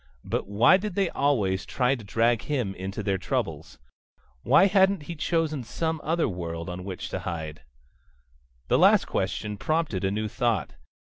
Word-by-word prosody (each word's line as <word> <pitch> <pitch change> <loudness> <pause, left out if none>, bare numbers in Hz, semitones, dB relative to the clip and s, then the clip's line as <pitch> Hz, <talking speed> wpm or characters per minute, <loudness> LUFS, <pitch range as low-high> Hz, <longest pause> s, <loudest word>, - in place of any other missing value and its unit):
But - - -3
why 105 - +5
did 200 -1 -5
they 195 -3 +1
always 105 -10 +1
try 125 0 +1
to 120 -5 -5
drag 115 +3 +1
him 125 -9 -2
into 95 +3 -5
their 95 -2 0
troubles? 85 - -3 0.6
Why 140 - +5
hadn't 195 -3 +3
he 170 - -6
chosen 160 -3 -1
some 160 +6 -3
other 165 +1 +1
world 85 -3 -5
on 90 +1 -6
which 95 -1 -6
to - - -3
hide? 80 -4 -5 1.1
The - - +3
last - - +6
question 105 0 -2
prompted 155 - -1
a 95 - +2
new 110 +2 -2
thought. 115 -2 -1
115 Hz, 165 wpm, -26 LUFS, 95-160 Hz, 1.1 s, last